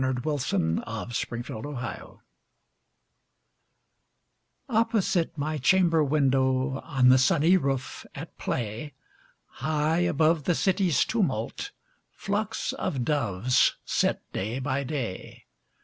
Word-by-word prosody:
Louisa 130 +2 -1
May 80 0 +1
Alcott 115 +1 -4
My 110 - -6
Doves 135 -3 -6 2.5
OPPOSITE 220 - +1
my 150 +1 -2
chamber 165 +1 +4
window, 135 -2 +1
On 135 -5 +2
the 130 +1 +6
sunny 165 +5 +4
roof, 135 -6 -2
at - - -8
play, 120 +5 -3 0.7
High 155 +3 +1
above 160 -3 +2
the 175 - +2
city's 190 -3 +2
tumult, 180 - -1 0.4
Flocks 210 +2 -2
of 135 -10 -2
doves 125 -4 +2
sit - - +1
day 110 +6 -2
by 135 +1 -1
day. 130 -9 -5
145 Hz, 100 wpm, -27 LUFS, 125-165 Hz, 2.5 s, the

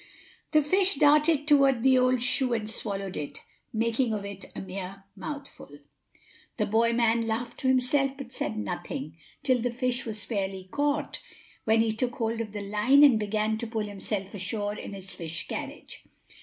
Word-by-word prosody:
The 305 -1 +5
fish 380 +5 +3
darted 295 +1 +4
toward 275 -5 +5
the 265 0 +6
old 255 -1 +3
shoe 255 0 +2
and 215 -2 -1
swallowed 200 -3 -3
it, 145 -1 -5 0.3
making 230 +1 +1
of 200 -1 -4
it 200 -1 -7
a - - -4
mere 190 +1 -6
mouthful. 280 - -8 0.8
The - - +1
boy 230 +2 +3
man 230 -1 +2
laughed 225 +2 -3
to 260 - -1
himself 265 +2 +2
but 260 -2 -8
said 220 - -2
nothing, 155 -7 -4 0.3
till 255 -2 +3
the 245 - 0
fish 245 0 -1
was 215 -1 -4
fairly 190 -4 -3
caught; 290 0 -1 0.4
when 225 0 +4
he 225 -1 +1
took 245 +2 -2
hold 230 0 -1
of 215 -2 -5
the 205 0 -5
line 215 +8 +4
and 260 -7 +7
began 215 +1 0
to 235 - -3
pull 220 -1 -2
himself 200 -1 -4
ashore 205 +1 -2
in 210 - -7
his 190 -1 -6
fish 165 -1 -5
carriage. - - -7
225 Hz, 175 wpm, -28 LUFS, 205-260 Hz, 0.8 s, and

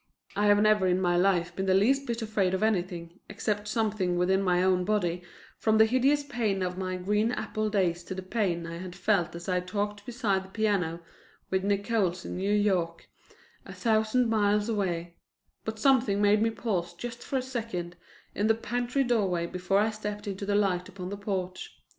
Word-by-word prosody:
I 205 +1 +2
have 205 0 +5
never 210 -2 +4
in 180 0 +2
my 175 -1 +2
life 175 -1 +2
been 190 0 -2
the 190 - +4
least 270 +8 +3
bit 235 -1 -2
afraid 200 -4 +1
of 190 - -2
anything, 180 -4 -1
except 205 0 -2
something 210 -5 0
within 190 +2 +2
my 180 -2 +2
own 185 -1 +3
body, 180 -4 0 0.4
from 220 -1 +3
the 220 - +7
hideous 265 +5 +2
pain 225 -8 -1
of 180 0 -2
my 185 0 -3
green 210 +5 +1
apple 215 -3 -2
days 180 -4 0
to 190 - -5
the 190 - -5
pain 185 -4 -1
I 170 0 -6
had 180 0 -7
felt 180 -2 +1
as 170 0 -8
I 180 -1 +1
talked 205 +3 -3
beside 215 -5 -1
the 190 - -14
piano 190 -6 0 0.5
with 190 0 +1
Nickols 200 -3 0
in - - -5
New 195 +2 -1
York, 185 -5 0 0.5
a - - -10
thousand 225 +2 +2
miles 210 -1 +2
away; 175 -6 -2 0.5
but 220 0 -4
something 250 -7 +3
made 205 +1 +4
me 225 - +3
pause 185 -7 -2
just 240 +5 -7
for 270 - -2
a - - 0
second 225 -9 -4 0.4
in 205 - 0
the 225 - +4
pantry 245 +4 -1
doorway 195 -9 +1
before 180 +2 -1
I 215 +2 +3
stepped 210 -1 -5
into 200 0 -4
the 205 - +1
light 190 -3 +1
upon 185 -2 -7
the 200 - -5
porch. 185 -2 -4
200 Hz, 195 wpm, -28 LUFS, 180-220 Hz, 0.5 s, the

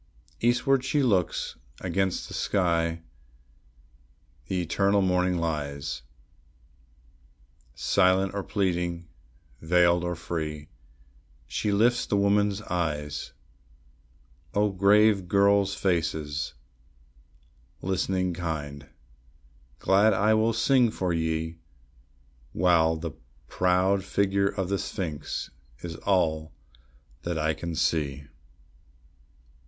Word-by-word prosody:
Eastward 125 +3 +2
she 140 +2 +1
looks; 95 -9 0 0.2
against 95 +1 -1
the - - -10
sky 85 -3 0 1.4
the 95 - -1
eternal 100 +3 +2
morning 90 -1 +1
lies; 75 -6 -3 1.7
Silent 95 0 +2
or 100 - -2
pleading, 90 -4 -2 0.5
veiled 85 +1 +3
or 90 0 -2
free, 80 -2 -5 0.8
she 105 - -2
lifts 120 +4 +2
the 100 - +1
woman's 100 +1 +2
eyes. 75 -5 -3 1.2
O 105 0 +2
grave 100 0 +4
girls' 100 +1 +3
faces, 80 -7 -1 1.3
listening 95 0 0
kind! 75 -4 -5 0.9
glad 100 +6 +3 0.2
will 110 +1 +3
I - - 0
sing 120 +1 +3
for 95 -5 -2
ye, 80 0 -2 0.9
While 85 -3 +3
the 80 - -5 0.4
proud 95 +2 +2
figure 100 0 +1
of 95 -3 -3
the 100 0 -1
sphinx 90 -7 -4 0.3
is 85 -2 -5
all 80 -5 0 0.7
that 85 -1 -3
I 80 0 +1
can 85 +1 -5
see. 75 -4 0
90 Hz, 95 wpm, -27 LUFS, 80-100 Hz, 1.7 s, grave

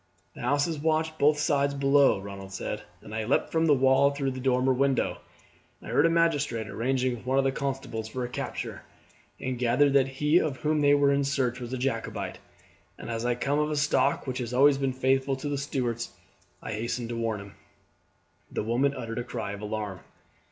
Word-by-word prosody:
"The - - -10
house 140 +4 +2
is 160 -3 -3
watched 160 +1 0
both 150 +1 +4
sides 140 -2 +1
below," 140 -4 +4
Ronald 95 -1 -8
said, 95 - -4 0.2
"and 105 - -10
I 110 0 -2
leapt 125 - +1
from 165 0 +2
the 150 - +6
wall 135 +1 +4
through 140 -1 -2
the 130 - -6
dormer 130 0 +2
window. 135 0 +1 0.6
I - - -10
heard - - +4
a - - +2
magistrate 145 -9 +1
arranging 125 +4 0
with 120 - -12
one 130 +1 +2
of 135 - +4
the 135 - +2
constables 135 -5 -4
for 125 +3 -4
a - - -4
capture, 125 - -5 0.6
and 130 -2 -3
gathered 125 +4 +3
that 135 -1 +4
he 150 +5 +2
of 145 -6 -1
whom 155 +1 0
they 145 0 +5
were 140 -1 +4
in 140 0 +2
search 130 -3 0
was 120 -1 -6
a 130 - -2
Jacobite, 125 -3 -3 0.6
and - - -7
as 115 +1 -2
I 120 - +1
come 140 +4 0
of 150 0 +1
a 150 - -1
stock 145 -1 +2
which 130 -1 -3
has 125 0 -3
always 140 +1 +5
been 135 -1 0
faithful 130 +1 +1
to 135 +2 -5
the 145 - -1
Stuarts, 125 -5 -2 0.5
I - - -5
hastened 115 +2 -3
to 120 - -3
warn 115 -2 -1
him." 100 0 -11 1.0
The - - -2
woman 130 +5 +1
uttered 115 -2 -4
a - - -2
cry 120 -4 -5
of 100 0 -7
alarm. 105 -3 -4
130 Hz, 210 wpm, -27 LUFS, 120-140 Hz, 1.0 s, the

